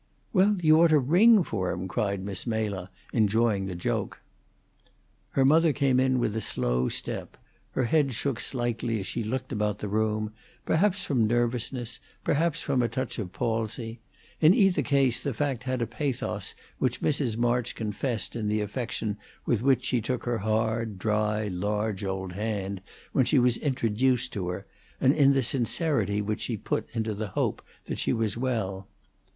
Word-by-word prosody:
"Well, 200 +1 +4
you 155 0 +6
ought 170 - +7
to 155 -1 +5
ring 185 - +6
for 95 - -2
him!" 90 +1 -3
cried 100 0 -1
Miss 100 +3 -5
Mela, 105 -5 -2 0.2
enjoying 110 -2 +2
the 90 - -4
joke. 85 - -2 1.1
Her 135 - +3
mother 160 +2 +5
came 135 -3 +2
in 130 0 +3
with 110 -3 0
a 110 - -1
slow 60 - 0
step; - - -4 0.4
her 130 - +1
head 135 0 +2
shook 135 -1 -1
slightly 120 -2 -1
as 95 - -5
she 115 - -3
looked 130 +4 -3
about 105 -3 0
the 105 - -4
room, 110 +1 0 0.3
perhaps 190 +3 +2
from 120 -6 +2
nervousness, 120 +1 -1 0.2
perhaps 165 +3 +1
from 130 - +1
a 120 - +1
touch 130 +1 -3
of 95 -5 -4
palsy. 115 0 -2 0.4
In 160 +5 +6
either 195 -9 +4
case 135 -3 +2
the 140 -5 -3
fact 130 -2 -1
had 130 -2 0
a - - 0
pathos 130 +3 -3 0.2
which - - 0
Mrs. 135 -6 +1
March 120 0 +1
confessed 110 0 -2
in 110 -3 -2
the 105 +1 +1
affection 105 -1 -3 0.3
with 115 -3 +1
which 130 -1 +3
she 125 -2 +1
took 125 +3 -2
her 120 -2 -1
hard, 110 0 0
dry, 105 +1 0
large, 105 +2 -2
old 95 -1 -3
hand 100 -1 -3 0.3
when 130 - +3
she 145 - +3
was 125 -2 +4
introduced 125 -1 0
to 95 -3 -3
her, 95 +2 -5 0.3
and 130 - +4
in 140 -2 +5
the 135 -1 +2
sincerity 120 - 0
which 105 +1 -2
she 115 - -2
put 105 - -2
into 110 -1 -1
the 105 +1 -3
hope - - -1 0.2
that - - -4
she - - +1
was 110 -2 0
well. 110 -6 -2
115 Hz, 175 wpm, -27 LUFS, 105-130 Hz, 1.1 s, ought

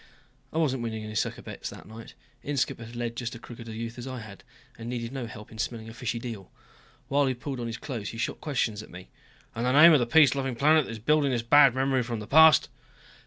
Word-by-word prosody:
I - - -5
wasn't 135 -6 +1
winning 110 -2 -4
any 110 0 -7
sucker 110 - -2
bets - - -7
that - - -12
night. 110 +2 -12 0.3
Inskipp 140 -4 -1
had 115 +1 -10
led 120 -1 -3
just 120 0 -5
as 115 - -11
crooked 115 -1 -10
a 110 - -7
youth 115 +2 -6
as 120 - -7
I 130 -2 -6
had, 105 -2 -12 0.3
and 115 -1 -8
needed 120 -1 -4
no 130 -4 -4
help 105 -1 -11
in 110 - -12
smelling 115 -1 -4
a - - -10
fishy 120 -1 -3
deal. 115 -5 -7 0.6
While 140 0 +2
he 130 - -1
pulled 130 +1 -6
on 120 - -3
his 115 0 -5
clothes 120 -8 -5
he 115 - -8
shot 125 - -3
questions 120 -8 -1
at - - -13
me. 90 +1 -12 0.4
"And 115 - -4
the 125 +1 +1
name 165 +1 +9
of 150 - +5
the 120 - 0
peace 140 0 +6
loving 135 -2 -2
planet 150 +4 +4
that - - -7
is 115 - -6
building 145 +5 +2
this 120 -3 -1
bad 140 +1 +6
memory 135 0 +1
from 120 -2 -4
the 105 - -7
past?" 160 +5 +6
120 Hz, 255 wpm, -27 LUFS, 115-135 Hz, 0.6 s, name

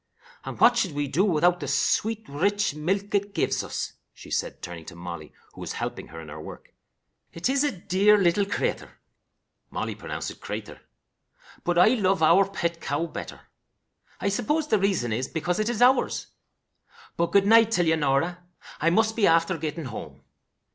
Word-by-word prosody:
And - - -7
what 240 0 +6
should 190 -8 0
we 145 0 -2
do 170 +7 +1
without 175 -2 +3
the 145 - -5
sweet, 220 +10 0
rich 200 +6 0
milk 190 +7 -2
it 200 0 0
gives - - 0
us!" - - -4 0.2
she - - -13
said, - - -3
turning 85 -2 -7
to 85 - -10
Molly, 85 -3 -8 0.2
who - - -11
was - - -5
helping - - -5
her 80 - -10
in 80 - -10
her 75 +1 -8
work. - - -11 0.6
"It 170 - -2
is 275 +2 +2
a 290 - +1
dear 195 +4 +3
little 195 +1 +2
creature" 200 - -3 0.7
(Molly - - -3
pronounced - - -5
it - - -15
crayther), - - -7 0.8
"but 175 0 0
I 180 +4 +7
love 195 -8 +2
our 190 +5 +5
pet 170 -3 -3
cow 145 +4 -1
better. - - -8 0.8
I 200 - 0
suppose 295 +9 -1
the 215 - +3
reason 190 - 0
is 125 +4 -2
because 175 +3 -2
it 215 +2 0
is 240 0 +1
ours. 255 +2 +3 0.9
But, 170 - +1
good 200 -1 +4
night 225 +1 +6
till 180 -6 +2
ye, 160 0 +3
Norah. 160 +4 0 0.4
I 165 - +3
must 220 +5 +2
be 220 - +3
after 165 +2 +3
getting 155 0 -4
home." 115 -4 -8
180 Hz, 180 wpm, -26 LUFS, 150-205 Hz, 0.9 s, I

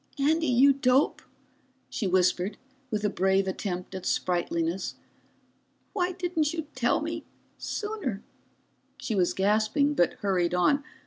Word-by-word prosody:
"Andy, 315 +3 +2
you 265 +3 +5
dope," 265 +1 +2 0.7
she 205 - -2
whispered 185 +1 +1 0.3
with 215 -2 -1
a - - +5
brave 190 0 +2
attempt 185 -1 -4
at 190 -1 -6
sprightliness. 175 0 -1 1.0
"Why 365 -3 0
didn't 340 -4 -1
you 320 - -2
tell 245 +2 +1
me 325 +1 -4 0.4
sooner?" 415 - -4 0.7
She 225 - -3
was 185 -4 +1
gasping, 215 +9 +2
but 175 - +2
hurried 180 -3 0
on. 280 +11 +3
215 Hz, 125 wpm, -27 LUFS, 185-295 Hz, 1.0 s, you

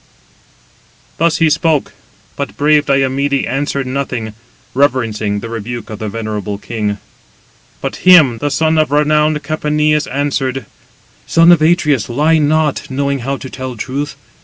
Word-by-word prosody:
Thus 165 0 +2
he 165 - +3
spoke; 155 -1 +1 0.4
but - - -5
brave 150 0 +3
Diomede 140 0 +1
answered 140 0 -2
nothing, 125 -4 -3 0.4
reverencing 115 -7 0
the 115 - -6
rebuke 115 0 -6
of 105 - -7
the 110 -2 -4
venerable 105 -2 -4
king. 105 -1 -3 0.8
But - - -4
him 155 -11 +6
the 145 - -1
son 160 +3 +1
of 155 - +2
renowned 150 +1 +2
Capaneus 150 0 0
answered: 135 -2 -2 0.6
"Son 165 +1 +5
of 170 -3 +5
Atreus, 150 - +2
lie 155 +6 +2
not, 155 0 0
knowing 140 +1 -1
how 135 +3 -3
to 130 - -8
tell 130 -2 -7
truth. 140 +6 -4
140 Hz, 135 wpm, -15 LUFS, 120-150 Hz, 0.8 s, him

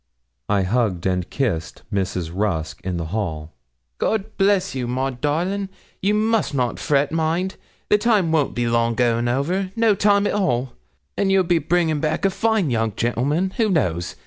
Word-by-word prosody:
I 100 -2 +2
hugged 100 -3 0
and 90 -1 0
kissed 95 - -2
Mrs. 95 -4 -2
Rusk 95 -5 -2
in 90 -1 -2
the 85 - -3
hall. 80 -8 -3 0.5
'God 215 -2 -1
bless 195 -1 +2
you, 130 -2 -3
Miss 125 - -2
Maud, 130 -1 -2
darling. 180 +7 -1 0.3
You 205 +2 +2
must 220 -6 +1
not 125 -3 -1
fret; 145 -2 +1
mind, 165 +4 0 0.3
the 210 - +4
time 210 -7 +2
won't 155 -4 +1
be 120 0 0
long 115 0 +1
going 120 -1 +1
over 175 +10 -1
no 230 -2 +4
time 200 0 +3
at - - 0
all; 130 -11 0 0.4
and 195 -1 +1
you'll 195 -1 +4
be 175 -1 +2
bringing 160 -3 +1
back 155 +4 -1
a 195 - +3
fine 220 - +1
young 115 -2 0
gentleman 140 +11 0
who 225 -3 +2
knows? 90 - 0
140 Hz, 175 wpm, -22 LUFS, 115-190 Hz, 0.5 s, the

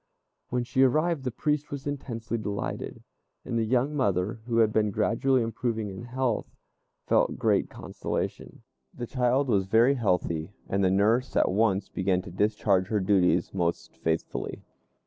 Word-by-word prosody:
When 125 0 0
she 125 +2 0
arrived 155 +2 +2
the - - +1
priest 150 +4 -1
was 140 -1 -6
intensely 120 -5 -4
delighted, 105 -2 -4 0.4
and - - -3
the 115 - +2
young 125 +6 +1
mother, 105 -4 0
who 115 -1 0
had 110 -2 +4
been 105 0 +2
gradually 115 +5 +2
improving 115 -1 -2
in 95 +5 -8
health, 125 -2 -2 0.5
felt - - +2
great - - +2
consolation. - - -5 0.3
The 120 - -4
child 125 +3 +1
was 100 -5 +1
very 115 +6 +5
healthy, 90 - -1
and 100 0 0
the 95 - +4
nurse 110 +7 +2
at - - +3
once 100 -1 +2
began 95 -1 0
to 90 - -9
discharge 100 -1 +1
her 105 0 0
duties 95 -3 +2
most 85 -3 -2
faithfully. 80 0 -3
110 Hz, 155 wpm, -27 LUFS, 95-125 Hz, 0.5 s, very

